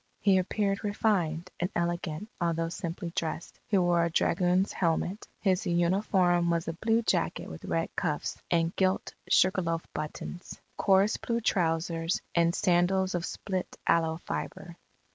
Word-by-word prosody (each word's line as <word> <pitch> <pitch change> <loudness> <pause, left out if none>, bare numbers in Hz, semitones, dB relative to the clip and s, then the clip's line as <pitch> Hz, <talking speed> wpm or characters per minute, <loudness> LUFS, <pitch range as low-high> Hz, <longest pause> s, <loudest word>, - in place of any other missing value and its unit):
He 195 -2 +4
appeared 200 +2 -1
refined 185 -5 0
and 175 - 0
elegant 170 +1 -2
although 165 -1 0
simply 170 0 -5
dressed. 165 0 -4
He 205 - +2
wore 175 -2 +3
a 170 - +1
dragoon's 180 +3 +2
helmet. 175 +3 -1
His 190 +1 +1
uniform 175 0 +2
was 170 -1 0
a 165 - -1
blue 225 +6 +1
jacket - - 0
with - - -9
red - - -2
cuffs - - -2
and 165 0 +1
gilt 190 0 0 0.2
sugar 185 +1 +4
loaf 165 -1 -2
buttons; 165 +3 -6 0.2
coarse 195 +1 +3
blue 235 0 -1
trousers; 165 -3 0
and 170 0 +3
sandals 185 +2 +2
of 175 -1 -1
split 185 -3 -4
aloe 160 -1 +2
fibre. 175 0 -6
175 Hz, 145 wpm, -29 LUFS, 170-190 Hz, 0.2 s, He